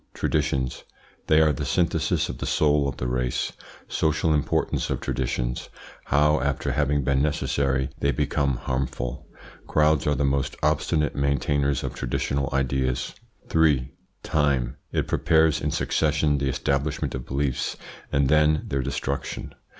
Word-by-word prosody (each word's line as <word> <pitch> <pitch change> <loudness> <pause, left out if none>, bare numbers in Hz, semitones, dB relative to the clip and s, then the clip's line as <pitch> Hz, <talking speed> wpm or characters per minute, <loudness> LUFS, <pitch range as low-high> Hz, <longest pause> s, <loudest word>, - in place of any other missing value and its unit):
TRADITIONS. 65 -1 -1 0.4
They 80 0 +5
are 80 -1 +4
the - - -4
synthesis 85 -2 +1
of - - -6
the - - -3
soul 75 -2 +3
of 60 - -7
the - - -3
race 60 0 -1 0.4
Social 80 0 +1
importance 75 -2 0
of - - -1
traditions - - -2 0.4
How, 75 +2 +3
after 70 -1 -1
having 75 -1 +1
been 70 +1 +2
necessary 70 -2 0
they 70 - +1
become 70 -3 0
harmful 65 0 -3 0.4
Crowds 75 -1 +3
are 75 - +2
the 70 - +1
most 70 0 0
obstinate 75 0 +1
maintainers 70 0 +1
of - - -3
traditional 70 +2 -1
ideas. 65 -2 0 0.4
3. 75 -6 +3 0.3
TIME. 70 -5 +1 0.2
It - - -1
prepares 80 -1 +3
in - - 0
succession 75 -2 +1
the 70 0 0
establishment 70 +2 -1
of 65 -2 -6
beliefs 70 -1 -1 0.3
and 70 -1 +2
then 75 +1 +3
their 70 -1 0
destruction. 70 +2 -4
70 Hz, 140 wpm, -25 LUFS, 65-75 Hz, 0.4 s, They